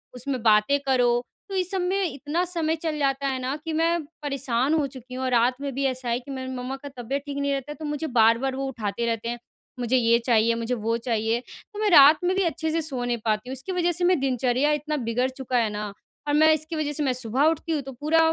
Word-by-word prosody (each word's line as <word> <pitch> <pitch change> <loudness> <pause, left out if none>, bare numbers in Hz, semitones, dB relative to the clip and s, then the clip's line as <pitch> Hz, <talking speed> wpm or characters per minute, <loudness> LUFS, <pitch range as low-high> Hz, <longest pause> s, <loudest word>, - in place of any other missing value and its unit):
उसमें 255 0 -3
बातें 220 +6 +4
करो, 245 -3 +2 0.2
तो 390 - -4
इस 370 0 0
सब 380 -2 -1
में 380 +2 0
इतना 295 +6 -2
समय 330 -3 0
चल 315 -1 -3
जाता 275 0 0
है 260 -1 -1
ना, 260 +3 -2
कि 315 +1 -6
मैं 330 +1 +1 0.2
परेशान 275 -1 0
हो 305 -3 +2
चुकी 255 -1 -12
हूँ 260 - -4
और 255 - -1
रात 245 +1 +3
में 280 -2 -3
भी 275 +1 -2
ऐसा 255 -2 -2
है 235 - +1
कि 265 +2 -10
मेरी 260 -1 -5
मम्मा 250 +2 -4
का 285 - -6
तबियत 265 +4 -3
ठीक 280 -1 -5
नहीं 280 0 0
रहता 275 +2 -4
है, - - -6
तो 310 - -8
मुझे 295 +2 -3
बार-बार 235 +4 +3
वो 270 0 -3
उठाते 230 -3 -3
रहते 230 0 -2
हैं। 240 0 -4 0.4
मुझे 245 +1 +2
ये 235 -1 +4
चाहिए, 230 -1 +3
मुझे 230 +2 -2
वो 230 0 -1
चाहिए, 230 -1 0 0.3
तो 415 - -7
मैं 425 -1 +2
रात 300 -1 +9
में 365 +1 +1
भी 385 - +2
अच्छे 320 -2 -1
से 330 0 0
सो 270 -5 -3
नहीं 240 -1 0
पाती 215 +2 0
हूँ - - -3
इसकी 265 +8 -5
वज़ह 350 -1 +1
से 350 +1 -3
मैं 360 -3 +3
दिनचर्या 260 +2 +1
इतना 300 +1 -1
बिगड़ 245 +1 0
चुका 260 -1 -3
है 225 -2 +2
ना। 210 -1 -5 0.3
और 290 - +1
मैं 315 +1 +6
इसकी 310 +2 -3
वज़ह 305 -2 -1
से 300 - -1
मैं 265 -3 +1
सुबह 255 +2 0
उठती 325 +1 -1
हूँ, 300 -3 0
तो 270 - -8
पूरा 300 +6 +1
270 Hz, 260 wpm, -25 LUFS, 245-310 Hz, 0.4 s, रात